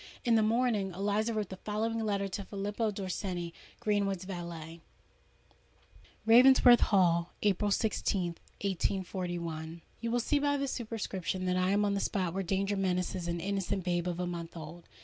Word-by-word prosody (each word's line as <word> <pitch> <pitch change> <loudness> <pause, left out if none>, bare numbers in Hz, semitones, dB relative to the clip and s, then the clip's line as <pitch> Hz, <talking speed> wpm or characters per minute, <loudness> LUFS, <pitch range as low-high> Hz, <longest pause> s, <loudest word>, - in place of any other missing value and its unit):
In 235 - +4
the 225 - +5
morning, 220 -3 +1
Eliza 205 +4 0
wrote 215 -3 -2
the 190 - -7
following 220 +3 -2
letter 200 -3 0
to 195 +1 -4
Filippo 205 +3 -2
Dorsenni, 185 -3 -4 0.3
Greenwood's 200 -4 0
valet:— 170 -3 -7 1.4
"Ravensworth 245 +1 +8
Hall, 175 -4 +3
April 205 0 +2
16th, 195 -4 0 0.3
1841. 175 -4 -3 0.2
"You 230 - -3
will 240 +1 +1
see 285 +5 +1
by 285 0 +1
the 275 0 -1
superscription 210 -7 -3
that 180 0 +1
I 185 0 +2
am 205 +1 +3
on 200 - +1
the 200 - 0
spot 185 -4 -1
where 195 - -1
danger 195 +2 0
menaces 180 -2 -1
an 170 0 -2
innocent 195 0 -2
babe 175 0 0
of 175 -1 -2
a 180 - 0
month 170 -1 -5
old. 165 +2 -9
195 Hz, 160 wpm, -31 LUFS, 175-215 Hz, 1.4 s, Ravensworth